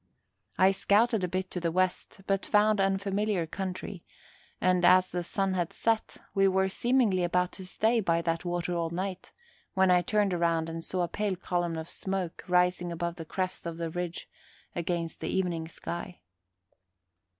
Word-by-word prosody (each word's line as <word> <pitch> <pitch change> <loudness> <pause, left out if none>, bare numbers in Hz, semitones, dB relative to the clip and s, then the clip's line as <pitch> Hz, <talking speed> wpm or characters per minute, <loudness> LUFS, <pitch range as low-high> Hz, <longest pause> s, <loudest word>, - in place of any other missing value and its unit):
I 190 +1 +6
scouted 210 +2 +2
a - - +2
bit 185 +1 -3
to 180 - -2
the 170 -1 -1
west, 185 +2 -1
but 195 -1 0
found 210 -1 +3
unfamiliar 195 -1 +1
country, 185 +1 -5 0.6
and, 180 -1 +2
as 185 +1 +6
the 175 - -1
sun 190 +2 -1
had 175 -2 -1
set, 225 -1 0 0.2
we 195 -1 +4
were 190 0 +2
seemingly 230 -4 +2
about 180 +1 +1
to 190 - -9
stay 225 +5 +2
by 170 -5 +1
that 165 -1 -1
water 175 0 -2
all 165 -1 0
night, 185 +2 -4 0.4
when 190 -1 +4
I 180 0 +5
turned 205 0 +1
around 165 -2 +1
and 165 0 -5
saw 180 +2 -1
a - - 0
pale 205 +1 -1
column 175 -2 -2
of 160 0 -5
smoke 190 -3 -4
rising 180 -1 +2
above 170 +1 -3
the 165 - -6
crest 185 +1 -3
of 165 -1 -5
the 165 -1 -3
ridge 175 0 -4 0.5
against 170 -1 -2
the - - -3
evening 175 -4 -1
sky. 175 +2 -7
180 Hz, 170 wpm, -29 LUFS, 170-195 Hz, 0.6 s, I